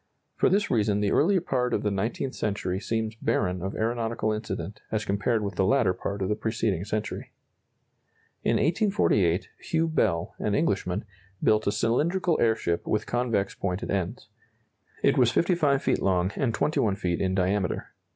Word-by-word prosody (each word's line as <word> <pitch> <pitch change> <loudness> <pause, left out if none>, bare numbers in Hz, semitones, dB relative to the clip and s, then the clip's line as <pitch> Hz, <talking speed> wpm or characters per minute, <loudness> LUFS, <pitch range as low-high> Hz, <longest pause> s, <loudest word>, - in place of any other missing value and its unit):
For - - +3
this 205 +2 +1
reason 105 -3 +2
the 105 -1 +1
early 195 -2 +4
part 125 -7 0
of - - -2
the 105 - +1
nineteenth 115 +6 -2
century 95 -3 -2
seems 110 +1 -2
barren 90 -1 0
of 95 +2 -4
aeronautical 115 -1 -1
incident 105 -1 -5
as 110 -1 -1
compared 105 +3 0
with 100 - -4
the - - +3
latter 100 -1 +3
part 100 +2 -4
of - - 0
the 105 - +1
preceding 110 -5 -1
century. 105 +1 -4 1.1
In - - +2
1848, 150 - +2
Hugh 165 0 0
Bell, 100 - 0
an 105 - 0
Englishman, 105 - 0 0.4
built 110 -1 +3
a - - +3
cylindrical 155 - +1
airship 110 -7 +1
with 105 - 0
convex 115 -5 0
pointed 90 -1 -3
ends. 95 -3 -2 0.8
It - - +4
was 125 -2 +5
55 155 -3 +2
feet - - +1
long 90 0 +1
and 130 -4 0
21 110 -6 +1
feet 90 -3 -2
in 95 -1 0
diameter. 95 0 -1
110 Hz, 160 wpm, -27 LUFS, 95-125 Hz, 1.1 s, was